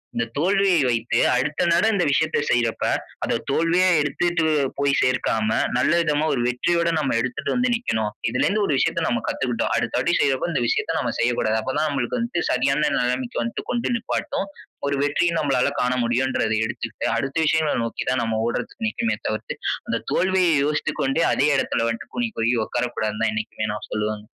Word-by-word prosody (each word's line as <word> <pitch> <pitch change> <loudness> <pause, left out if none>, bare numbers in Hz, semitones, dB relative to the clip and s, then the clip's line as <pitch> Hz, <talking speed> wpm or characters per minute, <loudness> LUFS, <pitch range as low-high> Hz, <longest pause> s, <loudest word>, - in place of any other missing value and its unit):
இந்த 115 - 0
தோல்விய 195 +4 +3
வைத்து 115 -1 0 0.2
அடுத்த 145 +4 0
நட 170 +5 +3
இந்த 185 -3 +2
விஷயத்த 155 +2 +1
செய்யறப்ப 120 -2 +1 0.4
அத - - 0
தோல்வியா 175 +3 +3
எடுத்துட்டு 165 +3 0 0.4
போய் 140 0 +2
சேர்க்காம 110 -4 +1 0.3
நல்ல 130 - +2
விதமா 150 -2 +1
1 125 - 0
வெற்றியோட 170 +8 +1
நம்ம 140 -6 0
எடுத்துட்டு 120 +1 -2
வந்து 250 0 +2
நிக்கணும். 110 - -1 0.2
இதுலேருந்து 200 - +1
1 150 - 0
விஷயத்த 165 - +1
நம்ம 120 -1 0
கத்துக்கிட்டோம். 125 -2 -1
அடுத்தபடி 125 +7 0
செய்றப்ப 135 +4 +1
இந்த 145 - 0
விஷயத்த - - 0
நம்ம - - -1
செய்யக்கூடாது. 115 -2 +1
அப்ப 130 +4 -3
தா 155 - +2
நம்மளுக்கு 140 - -2
வந்து 235 -6 -1
சரியான 140 +4 +2
நெலமைக்கு 125 0 -1
வந்து 115 - -4
கொண்டு 240 0 -1
நிப்பாட்டு. 230 0 -2 0.5
1 140 - 0
வெற்றிய 145 +4 +1
நம்மளால 135 -4 +1
காண 125 - +1
முடியும்ன்றத 120 -1 0
எடுத்துக்கிட்டு 110 -1 -4
அடுத்த 135 +4 -3
விஷயங்கள 155 0 +2
நோக்கி 115 - -4
தான் 130 -2 +1
நம்ம 110 -1 -1
ஓடுறதுக்கு 125 - -3
நிக்கனுமே 225 +1 -1
தவிர்த்து 110 0 -3 0.3
அந்த - - -1
தோல்வியை 185 -2 +3
யோசித்து 150 0 -1
கொண்டே 135 +5 +1
அதே 140 - +2
எடத்துல 115 -3 0
வந்துட்டு 115 0 -5
கூனி 240 -1 0
குறுகி 115 +2 +2
உட்காரக்கூடாதுன்னு 115 -3 -2
தான் 110 - +1
என்னைக்குமே 110 0 -3
நான் 105 - -7
சொல்லுவேங்க. 105 0 -2
130 Hz, 170 wpm, -23 LUFS, 115-165 Hz, 0.5 s, தோல்விய